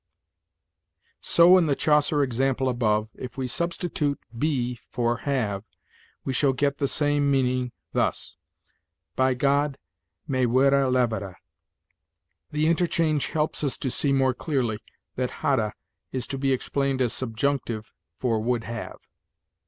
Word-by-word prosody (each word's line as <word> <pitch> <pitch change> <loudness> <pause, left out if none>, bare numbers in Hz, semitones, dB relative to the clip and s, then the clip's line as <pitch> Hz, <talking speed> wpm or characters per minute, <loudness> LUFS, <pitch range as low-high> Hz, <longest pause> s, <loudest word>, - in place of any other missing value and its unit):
"So, 175 +2 +6
in 170 - +2
the 140 - +2
Chaucer 150 0 +3
example 130 +1 0
above, 110 -3 +1
if 125 0 -8
we 130 -1 -2
substitute 165 -1 -1 0.2
'be' 125 -3 -1
for 120 -1 0
'have,' 110 -7 -2 0.6
we 135 - -1
shall 135 +1 +3
get 140 +2 0
the 140 - +1
same 145 0 +1
meaning, 130 -2 +1 0.2
thus: - - -1 0.8
'By 130 0 +2
God, 140 +1 +1 0.5
me 130 -4 +1
were 130 +3 +4 0.2
levere 110 -7 0 0.6
.' - - -49
The 150 +1 +1
interchange 165 -2 +1
helps 155 -1 -1
us 140 - 0
to 130 - -2
see 140 - +1
more 135 -1 +3
clearly 125 -6 -1 0.4
that 125 -1 0
'hadde' 115 -7 +2 0.4
is 130 -2 -3
to 135 - -3
be 135 0 +1
explained 135 +1 0
as 125 -3 +1
subjunctive 120 -2 -2 0.3
for 115 -4 0
'would 115 +1 0
have.'" 115 0 -7
130 Hz, 135 wpm, -25 LUFS, 120-145 Hz, 0.8 s, So